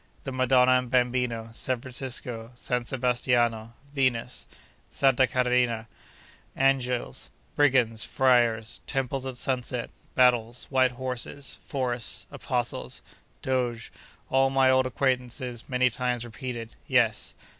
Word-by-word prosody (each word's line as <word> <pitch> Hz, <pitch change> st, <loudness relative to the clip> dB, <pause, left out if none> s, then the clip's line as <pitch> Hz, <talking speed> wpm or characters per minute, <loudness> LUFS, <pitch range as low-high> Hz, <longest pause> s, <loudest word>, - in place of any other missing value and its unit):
The 135 Hz, -, -4 dB
Madonna 130 Hz, 0 st, +4 dB
and 125 Hz, -1 st, -6 dB
Bambino, 125 Hz, -2 st, 0 dB
San 125 Hz, +2 st, -2 dB
Francisco, 120 Hz, -2 st, -5 dB
San 125 Hz, 0 st, -2 dB
Sebastiano, 120 Hz, -3 st, 0 dB, 0.2 s
Venus, 125 Hz, -3 st, -1 dB, 0.4 s
Santa 135 Hz, -1 st, +3 dB
Caterina, 125 Hz, -2 st, +1 dB, 0.7 s
Angels, 125 Hz, -, +1 dB, 0.3 s
Brigands, 125 Hz, -6 st, +3 dB
Friars, 120 Hz, -4 st, +2 dB
Temples 135 Hz, -1 st, -2 dB
at 130 Hz, -2 st, -5 dB
Sunset, 125 Hz, -2 st, -2 dB, 0.2 s
Battles, 120 Hz, -2 st, +3 dB
White 130 Hz, -1 st, +3 dB
Horses, 130 Hz, +2 st, -4 dB
Forests, 125 Hz, -5 st, -2 dB
Apostles, 120 Hz, -2 st, -3 dB, 0.4 s
Doges, 120 Hz, -3 st, -1 dB, 0.4 s
all 135 Hz, 0 st, +4 dB
my 135 Hz, -1 st, +4 dB
old 130 Hz, 0 st, +3 dB
acquaintances 125 Hz, -2 st, -2 dB
many 125 Hz, -1 st, +2 dB
times 125 Hz, 0 st, -1 dB
repeated?—yes. 120 Hz, -1 st, -1 dB
125 Hz, 100 wpm, -27 LUFS, 120-130 Hz, 0.7 s, Madonna